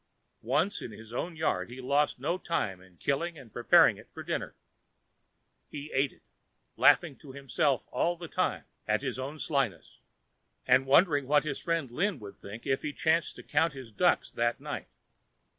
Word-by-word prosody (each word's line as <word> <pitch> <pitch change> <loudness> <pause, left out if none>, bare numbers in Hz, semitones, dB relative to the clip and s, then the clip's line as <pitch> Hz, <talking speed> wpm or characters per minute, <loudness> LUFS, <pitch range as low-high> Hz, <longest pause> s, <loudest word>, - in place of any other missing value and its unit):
Once 160 +9 +1
in - - -6
his 110 +2 -11
own 165 +7 -3
yard, 160 -6 -1
he 125 +2 -9
lost 140 +2 +1
no 150 +7 0
time 100 - -2
in 95 -2 -19
killing 160 - -1
and 130 -6 -13
preparing 120 - +5
it - - -15
for - - -8
dinner. - - -3 1.1
He 150 0 -7
ate 135 +1 +2
it, - - -24 0.5
laughing 165 -6 +5
to 140 -4 -12
himself 135 0 0
all 170 +7 +1
the 170 0 -7
time - - -1 0.2
at 110 +4 +1
his 130 -2 -2
own 140 +4 -5
slyness, 135 - -2 0.7
and 130 +1 +4
wondering 145 -1 +4
what 145 +1 +4
his 150 -3 -3
friend 165 -7 -1
Lin 180 +7 0
would 100 -2 -10
think 105 +3 -9
if 135 - +1
he 150 -1 -3
chanced 160 +2 +1
to - - -10
count 160 +2 +1
his 130 -4 -9
ducks 105 - +2
that 120 0 0
night. - - -5
140 Hz, 175 wpm, -30 LUFS, 120-155 Hz, 1.1 s, preparing